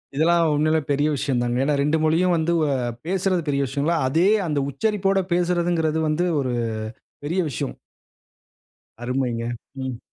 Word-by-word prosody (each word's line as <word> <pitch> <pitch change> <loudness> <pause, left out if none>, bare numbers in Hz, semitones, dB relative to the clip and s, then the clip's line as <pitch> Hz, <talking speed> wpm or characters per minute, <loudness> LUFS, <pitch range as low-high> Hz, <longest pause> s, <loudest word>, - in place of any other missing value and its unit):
இதெல்லாம் 170 +3 +3
உண்மையிலேயே 155 +1 +2
பெரிய 145 +2 +2
விஷயம் 130 -3 -1
தாங்க. 120 0 0
ஏன்னா 150 - +1
2 150 +3 +2
மொழியும் 170 +3 +3
வந்து 165 +2 +1
வ - - +2 0.4
பேசறது 185 -1 +1
பெரிய 140 0 +1
விஷியங்களா? 145 +6 0
அதே 165 +8 +3 0.2
அந்த 150 -2 0
உச்சரிப்போடு 195 +5 +1
பேசறதுங்கறது 175 -2 +1
வந்து 155 +3 +1 0.2
ஒரு 130 -3 -1 0.7
பெரிய 170 +6 -1
விஷயம். - - -4 1.3
அருமைங்க. 125 -2 -1 0.4
ம். 125 -2 -5
155 Hz, 135 wpm, -23 LUFS, 140-175 Hz, 1.3 s, இதெல்லாம்